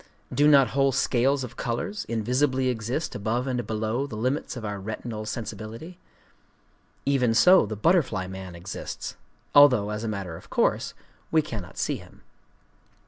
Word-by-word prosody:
Do 145 Hz, +1 st, +4 dB
not 140 Hz, -4 st, +6 dB
whole 135 Hz, 0 st, +2 dB
scales 135 Hz, +1 st, +2 dB
of 120 Hz, -1 st, -8 dB
colors 205 Hz, -, -3 dB
invisibly 130 Hz, +4 st, +1 dB
exist 125 Hz, +6 st, -2 dB
above 110 Hz, +5 st, -1 dB
and 125 Hz, -4 st, -2 dB
below 110 Hz, +5 st, -1 dB
the 110 Hz, -, -7 dB
limits 130 Hz, +5 st, -2 dB
of 115 Hz, -, -6 dB
our 105 Hz, -1 st, -4 dB
retinal 110 Hz, +2 st, -5 dB
sensibility? 115 Hz, -, -6 dB, 1.1 s
Even 125 Hz, -5 st, +2 dB
so 180 Hz, -, +6 dB
the 110 Hz, -, -4 dB
butterfly 115 Hz, -, +2 dB
man 95 Hz, -1 st, -8 dB
exists,—although, 105 Hz, +6 st, +1 dB
as 105 Hz, +1 st, -4 dB
a -, -, -2 dB
matter 100 Hz, -6 st, -4 dB
of -, -, -13 dB
course, -, -, +1 dB, 0.3 s
we 160 Hz, -1 st, +3 dB
cannot 100 Hz, -9 st, -7 dB
see -, -, -1 dB
him. -, -, -16 dB
120 Hz, 145 wpm, -26 LUFS, 105-135 Hz, 1.1 s, not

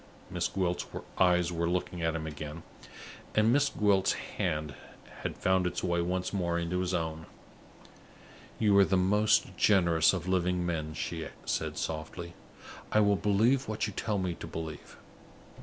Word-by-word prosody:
Miss 90 Hz, -1 st, 0 dB
Gwilt's 90 Hz, -2 st, -1 dB, 0.3 s
eyes 90 Hz, -1 st, +4 dB
were 85 Hz, 0 st, -1 dB
looking 90 Hz, -1 st, -2 dB
at 80 Hz, 0 st, 0 dB
him 80 Hz, -1 st, -3 dB
again, 75 Hz, +1 st, -7 dB, 0.7 s
and 110 Hz, +2 st, +4 dB
Miss 145 Hz, +1 st, +3 dB
Gwilt's 100 Hz, -3 st, +2 dB
hand 75 Hz, -2 st, -3 dB, 0.5 s
had -, -, -4 dB
found 95 Hz, -1 st, +2 dB
its -, -, -3 dB
way 85 Hz, -1 st, +1 dB
once 90 Hz, +2 st, -2 dB
more 85 Hz, -3 st, 0 dB
into 85 Hz, +1 st, -1 dB
his 90 Hz, 0 st, -1 dB
own. 80 Hz, -2 st, -3 dB, 1.3 s
"You 105 Hz, -3 st, +3 dB
are -, -, +8 dB
the 95 Hz, -, +2 dB
most 105 Hz, +4 st, +3 dB
generous 85 Hz, -5 st, +4 dB
of 90 Hz, -2 st, -4 dB
living 90 Hz, -1 st, +1 dB
men," 80 Hz, -3 st, -3 dB
she 80 Hz, -1 st, -4 dB, 0.2 s
said, -, -, -2 dB
softly. 80 Hz, +2 st, -4 dB, 0.6 s
"I 110 Hz, -, +4 dB
will 100 Hz, -1 st, +4 dB
believe 110 Hz, +7 st, +2 dB
what 110 Hz, 0 st, -1 dB
you 105 Hz, -, -5 dB
tell 105 Hz, +1 st, -1 dB
me 90 Hz, -2 st, -1 dB
to -, -, -8 dB
believe. 80 Hz, -2 st, -7 dB
90 Hz, 155 wpm, -30 LUFS, 85-100 Hz, 1.3 s, are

